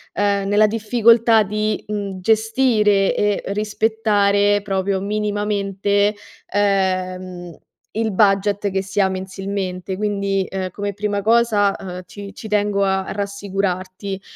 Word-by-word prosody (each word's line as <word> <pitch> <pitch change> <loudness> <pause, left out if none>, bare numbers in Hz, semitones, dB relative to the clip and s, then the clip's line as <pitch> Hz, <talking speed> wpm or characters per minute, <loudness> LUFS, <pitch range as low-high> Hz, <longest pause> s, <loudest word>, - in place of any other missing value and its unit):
nella 205 +1 +2
difficoltà 225 +1 +4
di, 215 +1 -2
mhmm, 200 -3 -4
gestire 220 -2 +2
e 205 -1 0
rispettare 205 -1 +1
proprio 195 0 -1
minimamente, 205 0 0 0.3
ehm, 185 -3 -1 0.4
il 225 -1 0
budget 200 0 +2
che 190 0 0
si 195 +2 -4
ha 195 - +4
mensilmente. 190 -1 -4
Quindi, 200 -1 -1
ehm, 190 -1 -3
come 205 +2 -4
prima 205 0 -2
cosa, 220 -2 +3
ehm, 180 -1 -7
ci 200 +1 -10
ci 220 - -9
tengo 205 -1 +1
a 190 0 0
rassicurarti 195 -1 -3
200 Hz, 115 wpm, -20 LUFS, 195-210 Hz, 0.4 s, difficoltà